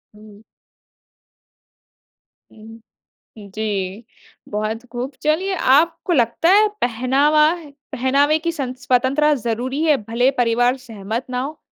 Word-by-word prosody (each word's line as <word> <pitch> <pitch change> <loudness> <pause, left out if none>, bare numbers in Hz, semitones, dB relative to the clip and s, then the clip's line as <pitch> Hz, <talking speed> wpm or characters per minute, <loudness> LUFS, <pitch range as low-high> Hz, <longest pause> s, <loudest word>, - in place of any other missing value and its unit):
हुँ। 210 -1 -16 2.1
हुँ, 225 +1 -14 0.7
जी। 205 0 -4 0.4
बहुत 215 +3 -3
खूब। 245 +2 -4
चलिए 345 +6 +1
आपको 330 +4 +2
लगता 245 +4 +2
है, 420 +3 +6
पहनावा 280 +7 +2 0.4
पहनावे 280 +4 +2
की 335 +1 -2
सं 275 -6 -4
स्वतंत्रता 260 +4 +2
ज़रूरी 255 +3 -2
है, 305 -3 +3
भले 235 +4 +1
परिवार 245 +2 +2
सहमत 225 -1 -6
ना 250 0 -2
हो? 295 +4 -6
255 Hz, 110 wpm, -20 LUFS, 225-300 Hz, 2.1 s, है